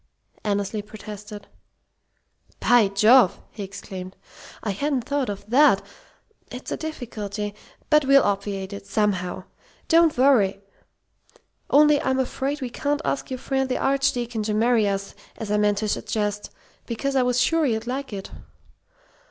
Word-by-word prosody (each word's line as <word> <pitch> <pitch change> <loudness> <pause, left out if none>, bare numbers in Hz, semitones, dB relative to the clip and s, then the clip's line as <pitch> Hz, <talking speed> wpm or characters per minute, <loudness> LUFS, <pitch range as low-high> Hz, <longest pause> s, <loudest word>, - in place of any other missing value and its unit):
Annesley 205 0 -1
protested. 210 0 -10 1.1
"By 240 -4 +5
Jove!" 215 +2 +5
he 215 - -9
exclaimed. 190 -1 -8 0.5
"I 210 - -1
hadn't 275 +4 -1
thought 280 -1 -1
of 200 0 -6
that. 280 +7 +5 0.7
It's - - -8
a - - 0
difficulty. 210 -9 -5 0.4
But 300 -1 +5
we'll 275 0 +6
obviate 200 -1 -2
it 200 0 -9
somehow. 195 -3 -1 0.4
Don't 330 -3 +4
worry! 240 -8 +4 1.1
Only 295 0 +5
I'm 260 0 0
afraid 270 +2 -2
we 255 - -3
can't 290 +4 -1
ask 280 - -2
your 260 - -3
friend 265 +1 -1
the 255 - 0
Archdeacon 250 -4 0
to 210 0 -1
marry 225 -1 +3
us, 195 0 -3 0.2
as 220 -3 -5
I 210 - +2
meant 210 -1 +2
to 215 - -1
suggest, 210 0 -2 0.4
because 275 +4 -2
I 265 - +4
was 250 0 +1
sure 325 +4 +2
you'd 225 -2 -1
like 265 +2 -4
it." 195 -2 -7
220 Hz, 145 wpm, -24 LUFS, 205-270 Hz, 1.1 s, we'll